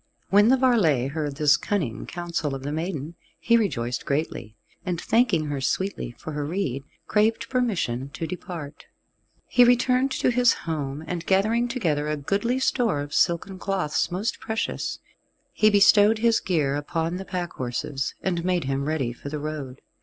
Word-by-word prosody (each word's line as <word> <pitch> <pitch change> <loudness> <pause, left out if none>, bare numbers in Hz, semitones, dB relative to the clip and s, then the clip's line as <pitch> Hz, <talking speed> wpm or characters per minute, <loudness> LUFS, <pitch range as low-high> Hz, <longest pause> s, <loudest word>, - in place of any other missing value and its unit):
When 205 +2 +6
the 260 +2 +5
varlet 180 - +3
heard 150 -2 -3
this 150 0 +4
cunning 150 - -2
counsel 170 -5 -3
of 135 - -7
the 145 - -3
maiden, 160 -1 -3 0.3
he 235 - +3
rejoiced 125 - 0
greatly, 140 -7 -3 0.3
and 180 -2 -2
thanking 210 -9 +2
her 145 -2 -3
sweetly 185 -5 -2
for 160 - -7
her 150 -1 -3
rede, 145 -5 -2 0.2
craved 225 +2 +1
permission 180 - -1
to 165 - -4
depart. 160 -3 -7 0.6
He 245 - +5
returned 250 +2 +3
to - - +1
his 245 0 +4
own 165 - -1
home, 140 0 -4
and 170 0 -4
gathering 220 +5 +2
together 165 - -1
a 150 0 -1
goodly 200 - 0
store 245 - +1
of 145 0 -7
silken 185 +2 +1
cloths 190 -7 -1
most 185 +5 -2
precious, 220 0 -3 0.6
he 215 - +4
bestowed 205 +1 +6
his 230 +1 +3
gear 150 -7 0
upon 165 +4 -2
the 190 - -5
pack 180 -2 -4
horses, 135 +3 -3
and 175 -3 -1
made 180 -2 +1
him 135 +1 -2
ready 140 -6 -1
for 140 - -8
the 150 - -4
road. 145 -3 -6
170 Hz, 170 wpm, -25 LUFS, 145-210 Hz, 0.6 s, When